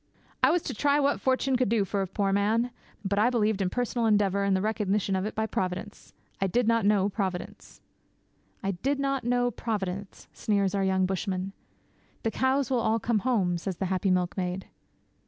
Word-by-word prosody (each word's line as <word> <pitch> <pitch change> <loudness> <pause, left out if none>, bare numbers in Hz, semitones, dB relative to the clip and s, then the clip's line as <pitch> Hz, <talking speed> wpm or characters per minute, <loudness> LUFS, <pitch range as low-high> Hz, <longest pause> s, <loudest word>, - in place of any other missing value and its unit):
'I - - +6
was 350 - +2
to - - -4
try 285 +5 +2
what 285 0 +1
fortune 260 0 +1
could 250 -4 +1
do 220 -3 +2
for 195 +1 -1
a 190 - -1
poor 195 +1 0
man; 220 +5 +1 0.3
but 200 +1 +1
I 225 +3 +4
believed 220 -4 +1
in 185 - +1
personal 240 +1 0
endeavour 200 -2 +2
and 200 -1 +2
the - - -1
recognition 210 -2 0
of 190 +2 -1
it - - -6
by 220 - 0
Providence. 190 0 -4 0.3
I 195 - +3
did 240 +5 +1
not 230 -3 +3
know 200 -2 +3
Providence.' 190 -3 -5 0.8
'I 195 - 0
did 275 +1 0
not 275 -1 0
know 245 +1 +1
Providence!' 200 -4 -4
sneers 200 -3 0
our 200 -1 +1
young 190 -1 +2
bushman. 190 0 -2 0.7
'The 225 - 0
cows 265 +1 +1
will 250 - +3
all 220 0 +2
come 225 0 +1
home,' 195 -7 +1
says 185 0 -4
the 195 - -1
happy 190 +1 0
milkmaid. 180 0 -1
205 Hz, 195 wpm, -28 LUFS, 190-240 Hz, 0.8 s, I